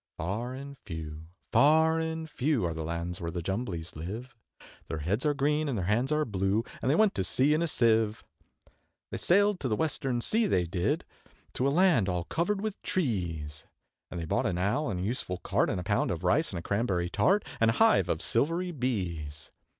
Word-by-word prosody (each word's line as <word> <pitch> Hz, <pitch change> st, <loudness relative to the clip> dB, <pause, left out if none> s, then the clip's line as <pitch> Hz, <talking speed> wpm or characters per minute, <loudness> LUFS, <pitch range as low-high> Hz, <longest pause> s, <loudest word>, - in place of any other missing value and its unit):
Far 115 Hz, +9 st, -3 dB
and 140 Hz, +1 st, -9 dB
few, 80 Hz, -3 st, -7 dB, 0.2 s
far 160 Hz, +3 st, +5 dB
and 160 Hz, 0 st, -3 dB
few, 145 Hz, -, 0 dB
Are 85 Hz, -, -1 dB
the 80 Hz, 0 st, -4 dB
lands 85 Hz, +2 st, -4 dB
where 85 Hz, -, -2 dB
the 85 Hz, 0 st, -4 dB
Jumblies 95 Hz, -4 st, -3 dB
live; 110 Hz, -, -6 dB, 0.5 s
Their 80 Hz, -, -3 dB
heads 100 Hz, -, -1 dB
are 145 Hz, -, +2 dB
green, 150 Hz, +2 st, +1 dB
and 125 Hz, -, -1 dB
their 90 Hz, -, -1 dB
hands 120 Hz, +8 st, +1 dB
are 155 Hz, 0 st, +2 dB
blue, 100 Hz, 0 st, 0 dB, 0.2 s
And -, -, 0 dB
they 145 Hz, -, +4 dB
went 215 Hz, +2 st, +4 dB
to 95 Hz, -, -1 dB
sea 130 Hz, +10 st, +2 dB
in 155 Hz, -, +1 dB
a 170 Hz, -, +1 dB
Sieve. 115 Hz, -5 st, +2 dB, 0.9 s
They -, -, -3 dB
sailed 200 Hz, +1 st, +3 dB
to 135 Hz, -, -2 dB
the 110 Hz, -, +1 dB
Western 135 Hz, -3 st, -1 dB
Sea, 220 Hz, -, +1 dB
they 90 Hz, -, +2 dB
did, 85 Hz, +1 st, -1 dB, 0.5 s
To 130 Hz, -, +1 dB
a -, -, +4 dB
land 150 Hz, -, +4 dB
all 90 Hz, -1 st, -1 dB
covered 195 Hz, -, -1 dB
with 215 Hz, -2 st, -4 dB
trees, 85 Hz, -, -2 dB, 0.4 s
And 90 Hz, -, -5 dB
they 85 Hz, -, -3 dB
bought 80 Hz, -, 0 dB
an 90 Hz, -3 st, -1 dB
Owl, 105 Hz, +12 st, 0 dB
and 90 Hz, -4 st, -2 dB
a -, -, -2 dB
useful 100 Hz, -4 st, -3 dB
Cart, -, -, 0 dB
And -, -, -1 dB
a -, -, -4 dB
pound -, -, +1 dB
of -, -, -3 dB
Rice, -, -, +2 dB
and -, -, -4 dB
a 85 Hz, -, -5 dB
Cranberry 95 Hz, -4 st, 0 dB
Tart, 200 Hz, -, +3 dB
And 115 Hz, -, +4 dB
a -, -, +3 dB
hive 225 Hz, 0 st, +4 dB
of -, -, -1 dB
silvery 170 Hz, +5 st, +1 dB
Bees. 85 Hz, -, -3 dB
115 Hz, 210 wpm, -29 LUFS, -, 0.9 s, far